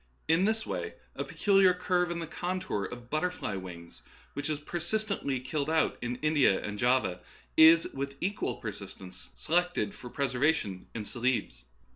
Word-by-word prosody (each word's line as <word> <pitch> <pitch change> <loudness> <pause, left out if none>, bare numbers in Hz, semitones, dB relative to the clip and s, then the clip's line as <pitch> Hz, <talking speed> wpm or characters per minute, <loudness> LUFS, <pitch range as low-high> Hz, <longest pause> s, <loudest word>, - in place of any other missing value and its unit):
In 165 +4 +4
this 220 +1 +1
way 440 - -4 0.2
a - - -2
peculiar 195 -3 +4
curve 180 -1 +1
in 175 - -2
the 170 - -3
contour 175 - -3
of 120 0 -9
butterflies' 155 - -1
wings, 85 -2 -10 0.3
which 145 +2 -3
is 150 -2 -1
per 160 +4 -4
sistently 175 - -2
killed 145 +1 -1
out 160 -1 +2
in 120 0 -2
India 145 -10 +4
and 105 0 -5
Java, 120 -8 +2 0.4
is 160 +1 +8
with 140 +1 -4
equal 200 +3 -1
persistency 95 -4 -9
selected 175 +4 0
for 125 -11 -10
preservation 130 - 0
in 110 -2 -4
Celebes. 120 - -1
145 Hz, 155 wpm, -30 LUFS, 120-175 Hz, 0.4 s, is